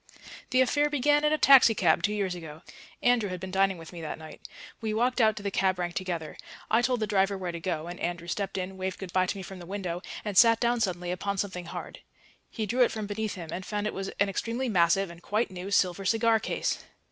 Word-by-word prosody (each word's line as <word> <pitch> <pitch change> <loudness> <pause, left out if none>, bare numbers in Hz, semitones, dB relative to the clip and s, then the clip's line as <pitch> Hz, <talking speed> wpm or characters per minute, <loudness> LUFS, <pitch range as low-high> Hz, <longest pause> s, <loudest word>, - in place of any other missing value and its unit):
The 255 0 +4
affair 290 +3 +2
began 290 +1 +2
in 300 - +3
a 310 - +3
taxicab 225 - +6
two 205 - +1
years 200 -3 -1
ago. 160 -2 -9 0.4
Andrew 245 -4 +3
had 185 -1 -5
been 190 +1 -6
dining 195 0 +2
with 165 +1 -11
me 170 - -7
that 155 - -5
night; 160 0 -11 0.4
we 215 -1 -2
walked 250 +2 +2
out 220 -2 +4
to 205 - -8
the 200 - -2
cab 190 -1 +1
rank 175 -1 -2
together; 175 -5 -4 0.3
I 225 +2 +5
told 245 -1 0
the - - +2
driver 200 -1 +1
where 185 -2 -4
to 170 - -6
go, 165 -3 -3
and 175 +1 -7
Andrew 170 0 -3
stepped 195 +2 -3
in, 190 +1 -4
waved 190 0 -3
good 190 -3 -8
bye 185 0 +3
to 200 - -2
me 190 - -6
from 190 +1 -9
the 175 - -10
window, 180 -3 -4 0.2
and 205 -2 -3
sat 230 +2 +7
down 240 0 +1
suddenly 180 -3 -1
upon 200 +2 -2
something 185 -3 -3
hard. - - -7 0.5
He 220 - -3
drew 245 +5 0
it 245 - +5
from 215 -1 -4
beneath 210 +1 -3
him, 170 -4 -8
and 185 - -4
found 210 +1 -3
it 210 - -2
was 195 0 -4
an 200 - +4
extremely 230 +6 -2
massive 180 -1 +3
(and 170 0 -13
quite 210 +3 -1
new) 185 +1 -6
silver 195 -1 +2
cigar 225 +3 +3
case. - - -2
195 Hz, 245 wpm, -28 LUFS, 180-220 Hz, 0.5 s, sat